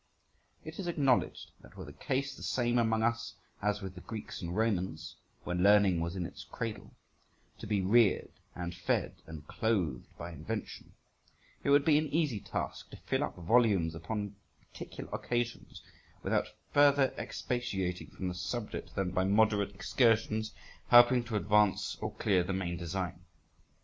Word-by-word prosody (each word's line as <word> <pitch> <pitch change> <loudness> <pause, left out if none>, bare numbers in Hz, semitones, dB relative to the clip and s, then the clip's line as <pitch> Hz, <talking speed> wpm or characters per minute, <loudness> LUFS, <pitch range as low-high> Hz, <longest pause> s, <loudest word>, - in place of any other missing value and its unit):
It - - -8
is 190 - -3
acknowledged 140 -7 +1
that - - -17
were - - -7
the - - -10
case 135 +1 -2
the - - -13
same 120 -1 +1
among 110 -1 +2
us 115 -2 -1 0.3
as 105 0 0
with 95 -1 -5
the 90 - -10
Greeks 110 -3 -7
and 85 0 -4
Romans, 95 -7 -1 0.3
when 90 0 -2
learning 100 -3 +5
was 85 +2 -2
in 90 -2 -2
its - - -8
cradle, 115 -2 -6 0.6
to - - -7
be 100 -2 +1
reared 105 +1 +4 0.2
and 90 0 -4
fed 85 -1 -1
and 80 -2 -9
clothed 95 - -1
by 85 - -6
invention, 95 +7 -6 0.7
it - - 0
would 140 0 +5
be 150 -2 +5
an 155 - -1
easy 145 -7 0
task - - -5
to - - -10
fill - - -1
up - - -4
volumes 95 -3 +3
upon 105 +4 -4 0.4
particular - - -8
occasions 120 -1 -3 0.4
without - - +1 0.3
further 145 -2 +5
expatiating 95 -8 -3
from 95 - -5
the 90 - -2
subject 90 +5 -5
than 95 -2 -1
by 95 +1 +1
moderate 100 0 +2
excursions, 110 0 +2 0.4
helping 120 0 +7
to 115 -2 -4
advance 105 -1 +2
or - - -4
clear 95 -4 +2
the 95 +2 -3
main 90 -2 -2
design. 85 0 -4
105 Hz, 160 wpm, -32 LUFS, 90-120 Hz, 0.7 s, helping